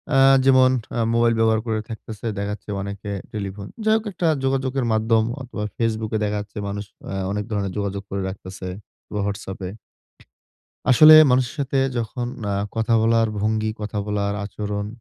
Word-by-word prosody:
আ -, -, +5 dB, 0.3 s
যেমন 130 Hz, -1 st, +6 dB, 0.3 s
আ -, -, +1 dB
মোবাইল 115 Hz, 0 st, +3 dB
ব্যবহার 110 Hz, -1 st, +3 dB
করে 110 Hz, -1 st, -1 dB
থাকতেছে 110 Hz, 0 st, -8 dB
দেখা 100 Hz, 0 st, -2 dB
যাচ্ছে 105 Hz, +1 st, -11 dB
অনেকে 100 Hz, +1 st, -6 dB, 0.2 s
টেলিফোন 100 Hz, -1 st, -5 dB, 0.2 s
যাই 220 Hz, -, +5 dB
হোক 220 Hz, -, -5 dB
একটা 175 Hz, -2 st, -1 dB, 0.2 s
যোগাযোগের 135 Hz, -1 st, 0 dB
মাধ্যম 110 Hz, 0 st, +3 dB, 0.2 s
অথবা 120 Hz, -4 st, -5 dB
Facebook 110 Hz, -1 st, -1 dB
এ -, -, +3 dB
দেখা 105 Hz, 0 st, 0 dB
যাচ্ছে 105 Hz, 0 st, -12 dB
মানুষ 100 Hz, +1 st, -4 dB, 0.2 s
আ -, -, -5 dB, 0.2 s
অনেক 105 Hz, 0 st, -2 dB
ধরনের 100 Hz, -2 st, -1 dB
যোগাযোগ 100 Hz, 0 st, -2 dB
করে 100 Hz, 0 st, -2 dB
রাখতেছে 95 Hz, -1 st, -8 dB, 0.5 s
বা 105 Hz, -, -1 dB
WhatsApp 100 Hz, -1 st, -5 dB
এ। -, -, -4 dB, 1.2 s
আসলে 155 Hz, +5 st, +9 dB, 0.2 s
মানুষের 125 Hz, +1 st, +2 dB
সাথে 135 Hz, 0 st, 0 dB, 0.2 s
যখন 120 Hz, +2 st, -3 dB, 0.2 s
আ -, -, 0 dB, 0.2 s
কথা 115 Hz, +1 st, +2 dB
বলার 115 Hz, 0 st, +3 dB
ভঙ্গি, 110 Hz, +1 st, 0 dB
কথা 105 Hz, 0 st, -3 dB
বলার 100 Hz, -1 st, -1 dB
আচরণ 105 Hz, 0 st, -4 dB
110 Hz, 170 wpm, -22 LUFS, 100-120 Hz, 1.2 s, আসলে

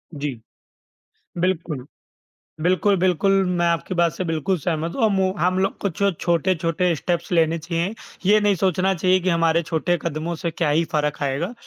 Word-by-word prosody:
जी। 140 Hz, -5 st, -4 dB, 1.0 s
बिल्कुल। 165 Hz, -7 st, -1 dB, 0.8 s
बिल्कुल, 185 Hz, +3 st, +2 dB
बिल्कुल 185 Hz, +2 st, +2 dB
मैं 175 Hz, -1 st, 0 dB
आपकी 170 Hz, +2 st, -1 dB
बात 170 Hz, -2 st, +3 dB
से 185 Hz, -, -3 dB
बिल्कुल 165 Hz, +3 st, 0 dB
सहमत 165 Hz, +1 st, -2 dB
हूँ 255 Hz, -, 0 dB
अम, 200 Hz, -3 st, +1 dB
औ 185 Hz, 0 st, +1 dB
हम 185 Hz, +1 st, +1 dB
लोग 195 Hz, -, 0 dB
कुछ 200 Hz, -1 st, -3 dB, 0.2 s
छोटे-छोटे 170 Hz, 0 st, +1 dB
स्टेप्स 175 Hz, +3 st, -2 dB
लेने 165 Hz, -1 st, +2 dB
चाहिए, 170 Hz, +4 st, -2 dB, 0.3 s
ये 210 Hz, +2 st, +5 dB
नहीं 205 Hz, -1 st, +3 dB
सोचना 190 Hz, +1 st, +1 dB
चाहिए 185 Hz, +2 st, +2 dB
कि 185 Hz, +1 st, -1 dB
हमारे 165 Hz, 0 st, +2 dB
छोटे 170 Hz, +2 st, 0 dB
कदमों 165 Hz, +1 st, -3 dB
से 170 Hz, -, 0 dB
क्या 160 Hz, -2 st, -1 dB
ही 160 Hz, +3 st, +2 dB
फ़र्क 150 Hz, -1 st, 0 dB
आएगा? 145 Hz, -, -2 dB
170 Hz, 170 wpm, -22 LUFS, 160-185 Hz, 1.0 s, ये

